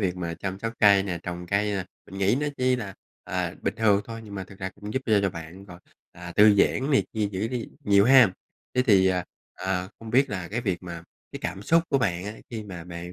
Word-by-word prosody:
việc 95 Hz, -3 st, 0 dB
mà 85 Hz, -2 st, -3 dB
chăm 95 Hz, +2 st, -5 dB
sóc 115 Hz, +2 st, -3 dB
cây 100 Hz, -2 st, +6 dB
nè, 90 Hz, -3 st, -3 dB
trồng 90 Hz, 0 st, -6 dB
cây 100 Hz, +2 st, +1 dB
nè, 95 Hz, -2 st, -2 dB, 0.2 s
mình 95 Hz, -, -9 dB
nghĩ 100 Hz, +4 st, +3 dB
nó 150 Hz, -, 0 dB
chỉ 130 Hz, 0 st, +2 dB
là, 105 Hz, -6 st, -6 dB, 0.3 s
à, -, -, -2 dB
bình -, -, -1 dB
thường 105 Hz, -3 st, +4 dB
thôi 115 Hz, 0 st, -7 dB
nhưng 100 Hz, -1 st, -9 dB
mà 95 Hz, -1 st, -4 dB
thực 95 Hz, 0 st, -15 dB
ra 95 Hz, -2 st, -3 dB
cũng 105 Hz, +1 st, -8 dB
giúp 130 Hz, -, -1 dB
cho 105 Hz, -3 st, +4 dB
cho 100 Hz, -, +1 dB
bạn 85 Hz, +4 st, -9 dB
rồi, 90 Hz, -3 st, -12 dB, 0.3 s
à, 85 Hz, 0 st, -9 dB
tư 105 Hz, 0 st, +7 dB
giãn 130 Hz, +7 st, +2 dB
này 135 Hz, -, +3 dB
kia 105 Hz, -2 st, 0 dB
giữ 100 Hz, +4 st, -2 dB
đi 120 Hz, -2 st, -4 dB, 0.2 s
nhiều 100 Hz, -1 st, +5 dB
ha. 125 Hz, -5 st, +7 dB, 0.4 s
Thế 125 Hz, -, +3 dB
thì, 95 Hz, -4 st, +5 dB
à, 90 Hz, -1 st, +1 dB, 0.3 s
à, 95 Hz, 0 st, -2 dB
không 115 Hz, -1 st, -9 dB
biết 135 Hz, +2 st, +3 dB
là 90 Hz, -3 st, -4 dB
cái 115 Hz, +4 st, -2 dB
việc 95 Hz, -6 st, -2 dB
mà 85 Hz, -2 st, -7 dB, 0.3 s
cái -, -, -5 dB
cảm 100 Hz, -, -4 dB
xúc 165 Hz, +8 st, +4 dB
của 135 Hz, -, +2 dB
bạn 90 Hz, -6 st, -1 dB
á 105 Hz, -, -4 dB, 0.2 s
khi 110 Hz, -3 st, -5 dB
mà 90 Hz, -5 st, -8 dB
bạn, 85 Hz, 0 st, -8 dB
100 Hz, 255 wpm, -26 LUFS, 90-110 Hz, 0.4 s, tư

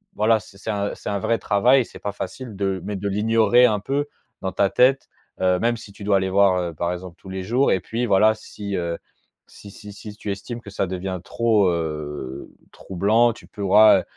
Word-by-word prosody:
voilà 110 Hz, +1 st, +3 dB
c'est 100 Hz, -1 st, -16 dB
c'est 100 Hz, -, -7 dB
un 100 Hz, -1 st, -2 dB
c'est -, -, -7 dB
un 100 Hz, -1 st, -1 dB
vrai 115 Hz, +4 st, 0 dB
travail 125 Hz, +6 st, +4 dB
et -, -, 0 dB
c'est -, -, -13 dB
pas 100 Hz, -, -4 dB
facile 115 Hz, +1 st, -7 dB
de 95 Hz, -1 st, -1 dB
mais 105 Hz, 0 st, -3 dB
de 100 Hz, +1 st, -3 dB
l'ignorer 115 Hz, +3 st, +4 dB
un 105 Hz, -4 st, +1 dB
peu 140 Hz, +5 st, -1 dB, 0.3 s
dans 95 Hz, -, -2 dB
ta 100 Hz, -, +2 dB
tête, 135 Hz, +2 st, +3 dB, 0.3 s
heu, 90 Hz, -1 st, +2 dB
même 120 Hz, +2 st, +1 dB
si 110 Hz, -2 st, -12 dB
tu 100 Hz, -, -12 dB
dois 100 Hz, -1 st, +3 dB
aller 95 Hz, 0 st, -1 dB
voir, 100 Hz, -1 st, +4 dB
heu, 85 Hz, -2 st, -3 dB
par 85 Hz, +3 st, -2 dB
exemple, 90 Hz, -1 st, -7 dB
tous 95 Hz, -, -12 dB
les 95 Hz, 0 st, -5 dB
jours 125 Hz, +7 st, +2 dB
et 95 Hz, -, +2 dB
puis 115 Hz, +6 st, -3 dB
voilà, 105 Hz, +2 st, +5 dB
si, 100 Hz, -2 st, -7 dB
heu, 85 Hz, -2 st, -2 dB, 0.5 s
si 100 Hz, -, -13 dB
si 105 Hz, +1 st, -11 dB
si 105 Hz, 0 st, -10 dB
tu 105 Hz, -1 st, -5 dB
estimes 115 Hz, +4 st, -6 dB
que 100 Hz, -, -11 dB
ça 95 Hz, -1 st, -1 dB
devient 95 Hz, 0 st, -4 dB
trop, 110 Hz, -5 st, +2 dB
heu, 75 Hz, -5 st, -4 dB, 0.2 s
troublant, 110 Hz, +6 st, +1 dB
tu -, -, -15 dB
pourras, 105 Hz, +2 st, +5 dB
heu, -, -, -5 dB
100 Hz, 225 wpm, -22 LUFS, 95-110 Hz, 0.5 s, voilà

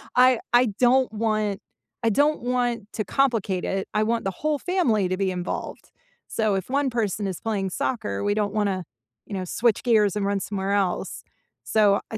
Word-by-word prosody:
I 255 Hz, -1 st, +6 dB
I 245 Hz, +1 st, +6 dB
don't 255 Hz, +1 st, +4 dB
want 215 Hz, -2 st, 0 dB, 0.4 s
I 230 Hz, -, +4 dB
don't 290 Hz, +7 st, +2 dB
want 245 Hz, -2 st, 0 dB
to 215 Hz, -, -2 dB
complicate 225 Hz, -9 st, +1 dB
it. 195 Hz, 0 st, -2 dB
I 215 Hz, -, +2 dB
want 230 Hz, +1 st, 0 dB
the 195 Hz, -, 0 dB
whole 305 Hz, -1 st, +1 dB
family 270 Hz, -, +1 dB
to 185 Hz, -, -1 dB
be 195 Hz, -1 st, 0 dB
involved. 180 Hz, -1 st, -5 dB, 0.4 s
So, 215 Hz, -2 st, 0 dB
if 190 Hz, +2 st, -3 dB
1 280 Hz, +1 st, +1 dB
person 210 Hz, -3 st, -1 dB
is 185 Hz, -3 st, -4 dB
playing 200 Hz, -4 st, -2 dB
soccer, 230 Hz, -, -2 dB
we 205 Hz, -, +2 dB
don't 205 Hz, -1 st, 0 dB
wanna, 200 Hz, -4 st, 0 dB, 0.4 s
you -, -, -9 dB
know, 185 Hz, -1 st, -3 dB
switch 225 Hz, +4 st, +1 dB
gears 215 Hz, -6 st, +3 dB
and 205 Hz, -1 st, -1 dB
run 200 Hz, 0 st, 0 dB
somewhere 195 Hz, 0 st, -2 dB
else. 195 Hz, -3 st, -1 dB, 0.4 s
So, 205 Hz, -2 st, +3 dB
uh, 220 Hz, -, -3 dB
215 Hz, 185 wpm, -24 LUFS, 195-245 Hz, 0.4 s, I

